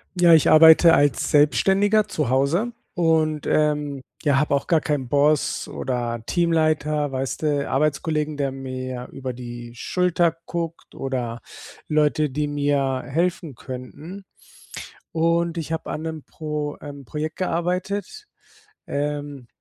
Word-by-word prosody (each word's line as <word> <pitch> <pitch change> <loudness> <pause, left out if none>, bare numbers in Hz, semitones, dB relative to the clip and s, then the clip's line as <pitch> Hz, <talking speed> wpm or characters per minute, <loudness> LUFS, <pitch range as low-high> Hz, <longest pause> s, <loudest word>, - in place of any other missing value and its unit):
Ja, 175 -1 +6
ich 160 -3 +5
arbeite 160 +1 +8
als 145 -4 +2
Selbstständiger 195 +8 +3
zu 150 -6 -2
Hause 140 - +1 0.2
und, 160 -3 +1
ähm, 150 -2 0 0.2
ja, 145 -2 +3
habe 150 -1 +1
auch 140 - -2
gar 165 -3 +3
keinen 145 -4 -2
Boss 145 +3 +1
oder 120 -3 -3
Teamleiter, 155 -3 +1
weißt 135 +3 -3
du, 145 -2 0
Arbeitskollegen, 150 +2 0
der 140 -2 -1
mir 130 -1 -6
über 130 -2 -5
die 120 -1 -8
Schulter 175 +4 +1
guckt 170 -1 -5
oder 125 -3 -3 0.5
Leute, 150 0 +2
die 150 +3 -2
mir 140 -2 0
helfen 165 -1 -1
könnten. 145 - -9 0.9
Und 170 +1 +1
ich 160 -1 -4
habe 160 - -4
an 155 - -4
'nem 160 -2 -5
Pro 150 -2 -5
ähm, 140 -1 -9
Projekt 155 +4 -4
gearbeitet, 185 - -2 0.6
ähm, 145 -2 -4
150 Hz, 130 wpm, -23 LUFS, 135-165 Hz, 0.9 s, arbeite